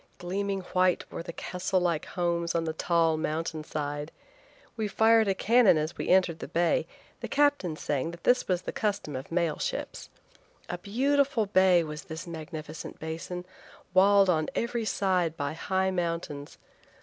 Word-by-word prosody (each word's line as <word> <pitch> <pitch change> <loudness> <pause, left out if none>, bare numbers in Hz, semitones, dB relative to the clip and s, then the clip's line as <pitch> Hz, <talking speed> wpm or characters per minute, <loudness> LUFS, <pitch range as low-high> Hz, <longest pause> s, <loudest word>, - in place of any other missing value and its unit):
Gleaming 195 +2 -2
white 185 -1 +2
were - - -5
the 170 0 -7
castle 185 +2 -2
like 170 -3 0
homes 170 -2 -1
on 165 - +1
the 160 -1 -2
tall 165 -1 +2
mountain 155 0 -2
side. 145 0 -4 0.6
We 220 -2 -1
fired 220 +1 +4
a 195 - +2
cannon 225 -3 +5
as 155 +2 -2
we - - -4
entered 180 -3 +3
the - - -6
bay, 170 0 +1 0.3
the - - -5
captain 285 - +2
saying 145 0 -2
that 170 0 -10
this 250 0 +3
was 180 -1 0
the - - -4
custom 200 - -2
of 130 +4 -7
mail 170 -3 0
ships. - - -4 0.6
A 175 - -4
beautiful 265 +3 +1
bay 185 -3 +4
was 150 -1 -7
this 160 0 -7
magnificent 160 -2 -7
basin, 165 +3 -5 0.5
walled 195 +1 +6
on 155 -4 +2
every 235 -1 -1
side 180 -6 0
by 145 0 -2
high 190 +3 0
mountains. 170 -5 -3
175 Hz, 160 wpm, -28 LUFS, 160-195 Hz, 0.6 s, walled